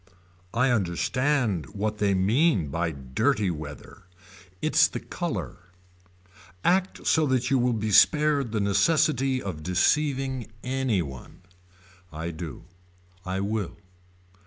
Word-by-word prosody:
I 125 +2 +3
understand 120 - 0
what 105 +1 -2
they 100 -2 +2
mean 100 - +2
by 85 +3 -1
dirty 70 +7 0
weather. 75 +4 -9 0.5
It's - - +4
the - - -5
color. - - -5 1.0
Act 185 +1 +1
so 160 -2 +3
that 130 0 0
you 135 - +4
will 125 +1 +2
be 110 -1 -2
spared 145 +2 +4
the 110 -2 -1
necessity 130 +5 +2
of 90 -6 -5
deceiving 130 - 0
anyone. 105 - -3 0.7
I 80 +2 -5
do. 80 -2 -8 0.6
I 95 +1 -2
will. 105 -1 -3
110 Hz, 110 wpm, -26 LUFS, 90-135 Hz, 1.0 s, It's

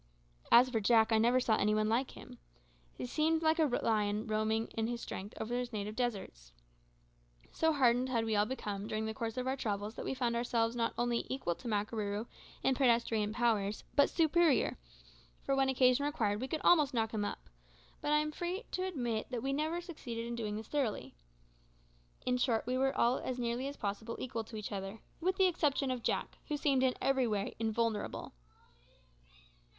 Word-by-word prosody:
As 245 +2 +8
for 240 -3 0
Jack, 220 +1 +4
I 220 - +4
never 240 +3 +4
saw 225 -3 +2
any 210 +1 +2
one 215 0 +2
like 240 +4 +1
him. - - -12 0.6
He - - -4
seemed 315 +5 +1
like 315 +1 +3
a 315 - +5
lion 215 -4 0
roaming 220 +1 0
in 225 0 -2
his 240 0 -3
strength 200 -2 -7
over 220 +2 -3
his 245 -1 -2
native 210 -1 -4
deserts. 195 - -3 1.0
So 320 0 +2
hardened 255 -3 +3
had 230 -3 +1
we 220 -1 0
all 205 +1 +3
become 210 -5 -4
during 215 0 -2
the 220 - -3
course 225 +1 -4
of 255 - -1
our 260 +1 0
travels 210 -4 -3
that - - -6
we - - -2
found 240 -2 0
ourselves 235 -1 0
not 230 -1 -1
only 240 -1 0
equal 260 -10 -1
to 240 - -10
Makarooroo 210 0 -1 0.4
in 265 - +3
pedestrian 230 -5 +2
powers, 215 -3 0
but 285 - +5
superior; 330 -3 +3 0.7
for 275 - +1
when 270 0 +2
occasion 255 +1 +4
required 220 -8 0
we 260 - -2
could 310 +2 -3
almost 300 -6 +5
knock 225 -1 +1
him 210 -2 -1
up, 205 - -5 0.5
but 295 - -1
I 300 - +5
am 305 0 0
free 355 +6 -3
to 370 - -2
admit 240 -10 -2
that 245 -2 -4
we 275 0 0
never 315 +4 -1
succeeded 250 -10 -6
in 235 0 -4
doing 215 -3 -3
this 220 0 -6
thoroughly. 275 -8 -2 1.1
In 250 0 +2
short, 235 -3 +1
we 250 +2 -1
were 270 +1 +1
all 240 +2 +3
as 255 - -4
nearly 240 +2 -1
as 285 - -6
possible 220 +2 -4
equal 235 -3 -4
to 225 - -10
each 210 -1 -5
other, 195 +2 -5 0.2
with 370 +2 +1
the 380 - +4
exception 295 -6 +1
of 250 -2 -3
Jack, - - -2
who 300 - -1
seemed 280 -3 +2
in 260 -1 +2
every 265 -2 +2
way 210 -2 -1
invulnerable. 225 -1 -1
235 Hz, 195 wpm, -33 LUFS, 220-270 Hz, 1.1 s, As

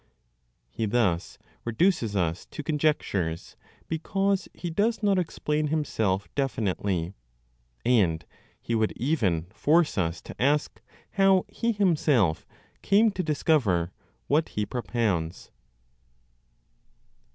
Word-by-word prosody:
He 110 - -2
thus 100 -6 0 0.3
reduces 120 - +1
us 85 -2 -1
to 150 - -7
conjectures 140 - -1 0.3
because 195 +4 0
he 175 - -6
does 215 +5 0
not 200 -2 +3
explain 150 -3 -1
himself 110 -11 0
definitely; 100 -9 -1 0.7
and 95 -10 +2 0.3
he 115 - -4
would 110 -1 +1
even 110 - 0
force 155 - +2
us 85 -1 -1
to - - -9
ask 145 +3 +1 0.3
how 195 -1 +4
he 230 +3 -1
himself 150 - +2 0.3
came 210 +3 +4
to 190 - -2
discover 140 - +1 0.3
what 155 +3 +1
he 105 - -2
propounds. 105 -10 -2
130 Hz, 105 wpm, -27 LUFS, -, 0.7 s, how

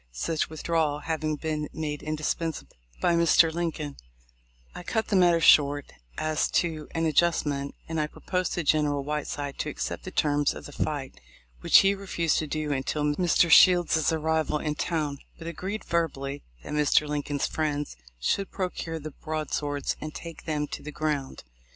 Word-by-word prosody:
Such 155 - -1
withdrawal 155 -2 0
having 155 -1 -1
been 150 -1 -3
made 150 -2 -3
indispensable 155 +1 -3 0.3
by 175 - +3
Mr. 170 -1 +5
Lincoln, 160 -4 -3 0.8
I - - -7
cut 220 +5 -2
the 205 - +2
matter 175 -2 +5
short 145 -3 +5 0.2
as 155 -1 0
to 160 -3 0
an 165 0 +1
adjustment, 145 -3 +1
and 160 -1 -1
I 150 - 0
proposed 180 +3 -2
to 175 - -1
General 145 -2 +2
Whiteside 145 -1 -4
to - - -1
accept - - -4
the - - -6
terms 145 -1 +1
of - - -9
the - - -9
fight, 145 -2 -3 0.4
which - - +6
he 195 - +5
refused 180 -5 0
to 155 - -3
do 155 0 -2
until 140 +2 -1
Mr. 170 +3 +2
Shields' 175 -4 +6
arrival 160 -1 0
in 150 0 -2
town, 150 -3 -2 0.2
but 165 - -10
agreed, 190 +6 -4
verbally, 145 -5 -1 0.2
that - - -6
Mr. 150 0 +3
Lin 150 0 -1
coln's 145 -1 -2
friends 150 - -2 0.2
should 195 - 0
procure 180 -3 -3
the 155 0 -7
broadswords, 150 -2 -3
and 155 -1 -6
take 165 -2 -8
them 150 -2 -1
to - - -6
the 150 - -7
ground. 150 -3 -3
155 Hz, 165 wpm, -27 LUFS, 145-165 Hz, 0.8 s, which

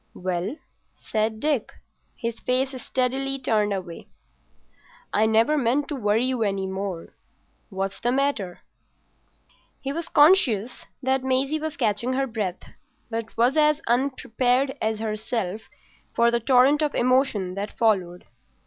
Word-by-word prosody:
"Well?" 185 +6 -3 0.4
said 220 0 -2
Dick, 290 -4 -1 0.4
his 230 -2 -4
face 260 +1 0
steadily 265 +2 -1
turned 215 -5 +1
away. 185 -4 -5 1.1
"I 215 +1 +3
never 225 +7 +3
meant 270 +3 +1
to 295 - -2
worry 220 -1 +1
you 255 -2 -1
any 195 -2 0
more. 190 -2 -5 0.6
What's 195 -1 -4
the 240 - 0
matter?" 260 -9 -1 1.2
He 275 0 -4
was 335 +2 -5
conscious 290 - +4 0.2
that 265 0 +1
Maisie 265 +4 +1
was 315 -1 -5
catching 235 +1 0
her 270 +1 +1
breath, 215 -7 -4 0.5
but 225 0 -5
was 245 +5 +3
as 300 -1 +4
unprepared 255 +1 +1
as 220 0 0
herself 215 -1 -3 0.5
for 235 0 +4
the 235 - +1
torrent 260 +5 +4
of 300 -1 0
emotion 245 -7 +2
that 200 +2 -4
followed. 185 -6 +1
235 Hz, 130 wpm, -24 LUFS, 210-270 Hz, 1.2 s, conscious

